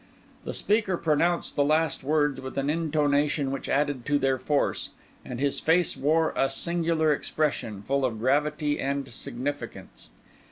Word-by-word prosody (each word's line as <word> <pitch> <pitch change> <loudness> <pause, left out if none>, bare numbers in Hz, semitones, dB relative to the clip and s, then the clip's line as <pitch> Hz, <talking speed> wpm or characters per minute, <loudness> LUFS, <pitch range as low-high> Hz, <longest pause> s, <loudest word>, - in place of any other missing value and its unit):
The - - -4
speaker 205 -3 +1
pronounced 170 +2 +1
the 145 - +3
last 155 0 +1
words 145 -1 +1
with 130 +1 -7
an 140 +1 +1
intonation 150 -3 +1
which 135 - -4
added 145 -2 0
to 145 - +3
their 135 -1 +1
force; 145 +2 0 0.3
and 125 - -6
his 140 0 0
face 170 +2 +2
wore 160 +3 +2
a 135 - +2
singular 165 -2 +1
expression, 140 -9 -2
full 140 +5 0
of 120 -4 0
gravity 145 +4 +1
and 140 0 -2
significance. 140 +4 -6
145 Hz, 150 wpm, -27 LUFS, 135-155 Hz, 0.3 s, the